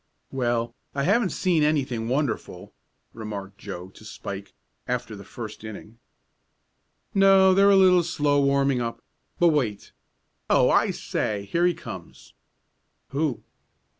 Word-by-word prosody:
"Well, 120 -2 -1 0.2
I 140 - 0
haven't 205 +4 +2
seen 175 -4 +1
anything 130 -7 0
wonderful," 135 -3 -3 0.4
remarked 100 -3 -7
Joe 95 -2 -7
to 105 - -17
Spike, 100 -2 -8 0.3
after 125 -3 -3
the 100 - -10
first 110 +1 -9
inning. 110 +1 -10 1.1
"No, 195 -1 +6
they're 200 +1 +5
a 200 - +6
little 185 -2 +6
slow 145 -4 +1
warming 140 -2 +2
up. 115 -1 -4 0.3
But 175 - +5
wait. 125 -10 -1 0.6
Oh, - - +4
I - - +3
say, 100 -2 -3
here 175 +1 +3
he 175 - +1
comes!" - - -10 0.8
"Who?" 140 -2 -2
135 Hz, 130 wpm, -25 LUFS, 110-170 Hz, 1.1 s, No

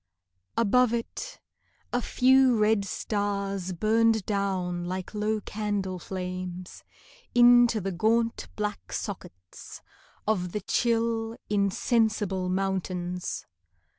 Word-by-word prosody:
Above 235 +2 +3
it, - - -6 0.5
a 245 - +1
few 260 0 +4
red 215 -1 +3
stars 200 -2 -2
Burned 220 +3 +2
down 190 -4 -1
like 185 +2 -5
low 215 +1 0
candle 205 -3 -3
flames 185 0 -6 0.5
Into 240 -1 +6
the 195 0 -3
gaunt 225 +5 +1
black 210 -1 -4
sockets 90 - -7 0.4
Of 180 -5 0
the 210 - -2
chill 230 +1 0
insensible 205 -2 +1
mountains. 185 -1 -2
205 Hz, 95 wpm, -27 LUFS, 185-225 Hz, 0.5 s, Into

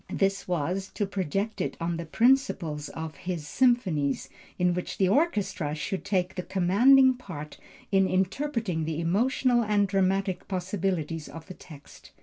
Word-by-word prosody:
This 195 0 0
was, 180 +3 -2
to 205 - 0
project 195 +2 -2
it - - -3
on 165 0 -2
the 170 -1 -6
principle 225 - +2 0.2
of 160 -1 -6
his 175 -5 -5
Symphonies, 185 - +1 0.3
in 180 -1 +2
which 180 0 -4
the 190 - +3
orchestra 205 - 0
should 185 +4 -4
take 185 -2 0
the 180 - -3
commanding 235 +10 +5
part 170 -12 -9 0.3
in 195 -1 +4
interpreting 190 - -1
the 160 0 -3
emotional 240 +8 +2
and 205 -2 +2
dramatic 195 -1 0
possibilities 180 -4 -2
of 165 -1 -10
the 185 - -9
text. 150 -5 -15
190 Hz, 145 wpm, -27 LUFS, 165-205 Hz, 0.3 s, commanding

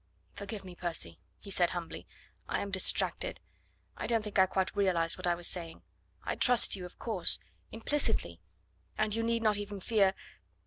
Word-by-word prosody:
"Forgive 200 0 -7
me, 185 - -9
Percy," 165 - -2 0.2
he 200 - -8
said 175 -2 +3
humbly; 175 -2 -6 0.4
"I - - 0
am 200 - -4
distracted. 200 - +1 0.6
I - - -4
don't 230 -2 +2
think 210 -2 -1
I 190 - +7
quite 190 +1 -1
realised 180 -5 +2
what 185 -1 -4
I 175 - +3
was 175 0 0
saying. 170 -2 -2 0.4
I - - -1
trust 245 -4 +5
you, 180 -2 -6
of 180 - -20
course... 205 -8 +1 0.3
implicitly... 225 - 0 0.6
and 215 -1 +1
you 230 - 0
need 230 0 0
not 215 -2 +4
even 205 -1 -5
fear... 195 -2 +2
195 Hz, 175 wpm, -32 LUFS, 175-215 Hz, 0.6 s, I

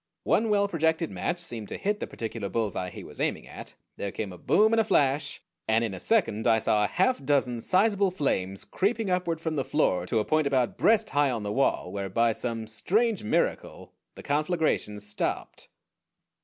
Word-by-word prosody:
One 225 0 +2
well 200 -1 +3
projected 160 -2 0
match 175 - -2
seemed 120 -11 -5
to - - -6
hit 210 +1 -1
the - - -4
particular 110 -3 -5
bullseye 100 -3 -2
he - - -9
was - - -9
aiming - - -1
at. - - -10 0.2
There 100 - -3
came 100 -3 -5
a - - -10
boom 220 +2 +3
and 225 - +4
a - - +4
flash, 145 -8 +1 0.2
and 110 +1 +3
in 110 -4 -2
a 95 - -6
second 165 - +1
I 110 - +5
saw 105 -1 +2
a - - +2
half 190 - +1
dozen 130 -4 +1
sizable 200 - +3
flames 95 - -2
creeping 210 0 -1
upward 175 -3 0
from 160 -1 -3
the 140 -3 0
floor 90 - +1
to 115 - 0
a 105 - +1
point 155 +4 +2
about 130 -3 +1
breast 220 -1 +3
high 145 -1 +3
on 115 -4 -2
the 105 0 -3
wall, 130 -8 +1
where 100 0 -4
by 115 +4 +2
some 115 0 -3
strange 205 - 0
miracle 105 - -1 0.2
the - - -11
conflagration 155 - 0
stopped. 105 +1 -3
140 Hz, 195 wpm, -27 LUFS, 110-185 Hz, 0.2 s, I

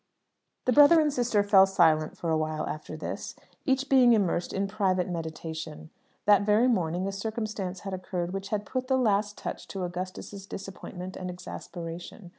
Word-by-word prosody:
The 255 - +3
brother 295 +4 +8
and 300 -2 +2
sister 240 -5 +2
fell 195 -1 +6
silent 160 -5 +3
for 170 - -2
a 160 - +3
while 155 0 -2
after 155 0 -6
this, - - -5 0.3
each 265 0 +2
being 255 -3 +6
immersed 185 -5 +1
in 195 +1 -1
private 190 -3 +1
meditation. 160 -2 -6 0.3
That 205 -1 +6
very 210 +4 +4
morning 180 -6 +1
a - - -2
circumstance 205 -3 -4
had 195 -1 -5
occurred 180 -1 -3
which 195 0 -4
had 210 -1 -2
put 255 +2 -3
the 265 0 +3
last 210 -4 +1
touch - - -6
to 190 -2 -5
Augustus's 185 +2 -6
disappointment 185 -1 -7
and 185 - -5
exasperation. 175 +1 -8
195 Hz, 170 wpm, -28 LUFS, 175-215 Hz, 0.3 s, brother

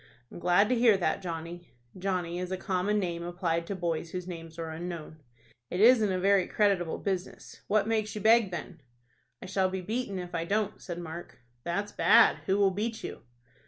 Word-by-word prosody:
"I'm - - -9
glad 180 +4 +4
to 255 - +3
hear 230 -4 +5
that. 180 - 0
Johnny." 170 -2 -7 0.2
(Johnny 180 -2 -2
is 180 0 -4
a 185 - -1
common 190 +2 0
name 175 -4 -2
applied 170 -1 -2
to 200 - -3
boys 170 -2 -2
whose 180 +1 -5
names 165 -2 -8
are 165 -1 -4
unknown.) 165 -1 -6 0.5
"It 180 - -3
isn't 220 -2 +6
a 185 - 0
very 195 -1 +3
creditable 195 -6 +1
business. 190 -2 -5
What 215 0 +2
makes 215 -2 -1
you 210 - -4
beg, 220 -1 +5
then?" 170 -4 -7 0.6
"I - - -7
shall 190 0 +1
be 190 0 -3
beaten 215 +1 -3
if 180 -1 -6
I 165 -1 -1
don't," 205 +4 -1
said 175 -2 -6
Mark. 170 -4 -8 0.2
"That's 200 +4 -2
bad. 235 - +5
Who 190 - +2
will 200 -1 +4
beat 220 +4 -3
you?" - - -6
185 Hz, 195 wpm, -29 LUFS, 170-205 Hz, 0.6 s, isn't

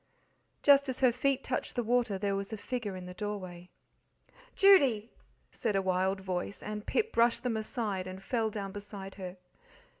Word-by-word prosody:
Just 280 -1 +6
as 260 0 -4
her 255 -2 +6
feet 270 +2 0
touched - - -3
the 245 - 0
water 235 -3 +1
there 200 0 0
was 195 +2 -4
a 220 - -3
figure 215 -2 -4
in 185 -1 -7
the 180 - -8
doorway. 185 -3 -6 0.9
"Judy!" 275 - +5 0.4
said 215 -3 -1
a 195 - +3
wild 190 +1 +1
voice; 185 +1 -4
and 210 0 -5
Pip 455 0 0
brushed 235 0 +3
them 245 -3 0
aside 215 -4 -2
and 185 +1 -8
fell 225 +1 0
down 200 -2 -5
beside 200 -1 -8
her. 180 0 -6
210 Hz, 175 wpm, -31 LUFS, 190-245 Hz, 0.9 s, Just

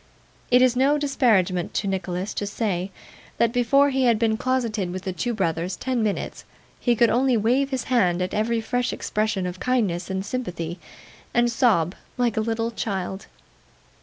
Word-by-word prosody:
It 250 +1 +6
is 255 -1 +3
no 275 +4 +3
disparagement 215 - +1
to 200 - 0
Nicholas 185 0 -3
to 205 - -3
say, 195 -3 -2 0.5
that 235 0 +2
before 275 +4 +4
he 265 -1 +1
had 235 -2 +4
been 220 0 +1
closeted 230 -6 -1
with 185 +1 -5
the 190 - -3
two 240 +6 -2
brothers 180 -4 -1
ten 255 -2 -2
minutes, 210 -2 -2 0.4
he 240 -1 +2
could 235 0 +4
only 255 0 +3
wave 250 +6 +2
his 265 -3 -2
hand 185 -9 +2
at 180 0 -2
every 225 +2 0
fresh 245 +2 -1
expression 210 -3 -1
of 180 0 -5
kindness 205 -9 0
and 190 0 -2
sympathy, 180 -9 -4 0.6
and 240 0 +3
sob 210 - +2 0.2
like 240 -3 +1
a 220 - +1
little 225 +1 -1
child. 195 -3 -4
225 Hz, 170 wpm, -24 LUFS, 190-245 Hz, 0.6 s, It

